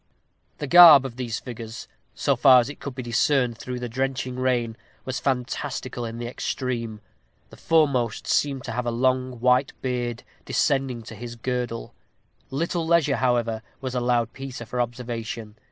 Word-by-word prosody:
The 150 - -4
garb 160 -3 +9
of 125 -3 -6
these 120 -3 -3
figures, 115 -2 -8 0.3
so 140 - +1
far 130 0 +7
as 120 +2 0
it - - -13
could 140 -3 -6
be 130 - -5
discerned 120 0 +1
through 125 -1 -5
the 125 - -4
drenching 130 +1 -2
rain, 125 -3 0 0.3
was 130 +1 -3
fantastical 130 -1 -3
in 115 0 -6
the 120 - -5
extreme. 120 -3 -3 0.5
The - - -13
foremost 140 -9 +1
seemed 135 -3 0
to - - -5
have 120 +1 -2
a - - +1
long 130 +1 0
white 125 +2 +3
beard 120 -2 -2 0.2
descending 135 -5 0
to 110 - -10
his 120 +2 -8
girdle. 120 -1 -3 0.6
Little 165 +4 -2
leisure, 160 -5 +3
however, 120 -3 +1 0.2
was 130 -2 -5
allowed 120 -2 0
Peter 135 -3 -7
for 125 +3 -2
observation. 115 -2 -5
125 Hz, 160 wpm, -24 LUFS, 120-135 Hz, 0.6 s, garb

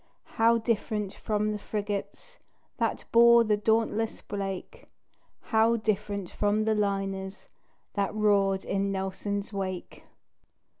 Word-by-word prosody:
How 230 +1 +6
different 215 -3 -1
from 210 0 -1
the 210 - -3
frigates 210 - -5 0.4
That - - -1
bore 235 0 +7
the 215 -2 +2
dauntless 220 +1 0
Blake; 195 -2 -6 0.5
How 225 +1 +3
different 205 -3 -2
from 210 +1 +1
the 220 0 +2
liners 195 -2 -2 0.4
That 200 -1 0
roared 200 -2 +2
in 195 0 0
Nelson's 200 +2 -3
wake! 185 -2 -5
205 Hz, 110 wpm, -28 LUFS, 195-220 Hz, 0.5 s, bore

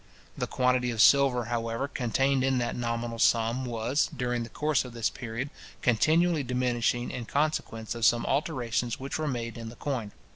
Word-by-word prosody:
The - - -2
quantity 125 -1 +1
of 115 -2 -4
silver, 130 -1 +5
however, 115 +2 -2
contained 135 +1 +1
in 135 -1 +2
that 120 -1 -1
nominal 115 -1 -3
sum 115 +3 +2
was, 120 +4 0
during 120 -1 -1
the 115 - -5
course 150 +1 +1
of 125 -2 -9
this 115 -2 0
period, 125 +3 -5 0.3
continually 155 +7 +3
diminishing 125 -1 0
in 120 - -5
consequence 140 -6 -1
of 115 -1 -6
some 120 +3 +4
alterations 125 -5 -1
which 140 +6 -4
were 155 - -1
made 115 -3 -3
in 115 -1 -6
the 115 - -11
coin. 120 -6 -3
120 Hz, 175 wpm, -28 LUFS, 115-135 Hz, 0.3 s, silver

